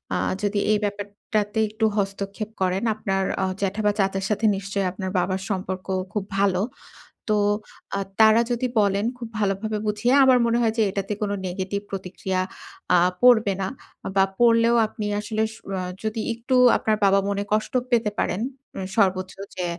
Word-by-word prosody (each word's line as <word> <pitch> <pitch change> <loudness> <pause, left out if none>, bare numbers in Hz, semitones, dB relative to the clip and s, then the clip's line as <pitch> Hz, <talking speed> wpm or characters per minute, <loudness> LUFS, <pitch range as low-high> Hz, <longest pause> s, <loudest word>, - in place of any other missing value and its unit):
আ - - +1 0.2
যদি 205 0 0
এই 215 - +4
ব্যাপারটাতে 205 +1 -2
একটু 215 +1 -1
হস্তক্ষেপ 200 +1 -3
করেন, 185 +2 +1
আপনার 195 -2 -1 0.2
অ - - +2 0.2
জ্যাঠা 200 +2 -1
বা 210 - +5
চাচার 195 0 0
সাথে 210 +1 0
নিশ্চয়ই 195 0 -2
আপনার 190 0 -5
বাবার 185 +2 -1
সম্পর্ক 185 -1 -3 0.3
খুব 210 - -1 0.2
ভালো। 195 -2 +2 0.7
তো 215 - +3 0.6
আ - - -1 0.2
তারা 220 +1 +7
যদি 240 +1 0
বলেন 200 0 +1
খুব 240 -2 -6
ভালোভাবে 210 +1 -1
বুঝিয়ে, 210 +4 +1
আমার 260 -1 +6
মনে 235 0 +2
হয় 225 -2 +2
যে, - - +3
এটাতে 195 +1 -3
কোন 205 -1 -1 0.2
নেগেটিভ 190 +2 -3
প্রতিক্রিয়া 185 -1 -3 0.5
আ - - +6 0.2
পড়বে 225 -5 +6
না। 190 - 0 0.5
বা 195 - +5 0.2
পড়লেও 230 0 +5
আপনি 215 0 -6
আসলে 215 +1 -2
সু 220 - -15 0.2
আ - - -2 0.2
যদি 220 0 -2
একটু 235 +3 -2 0.2
আপনার 215 -1 0
বাবা 195 0 +5
মনে 200 0 -1
কষ্ট 215 0 0 0.2
পেতে 230 -3 +2
পারেন। 180 - 0 0.4
উ - - -3 0.2
সর্বোচ্চ 185 -2 +1 0.2
যে, 180 - -1
205 Hz, 165 wpm, -24 LUFS, 195-220 Hz, 0.7 s, তারা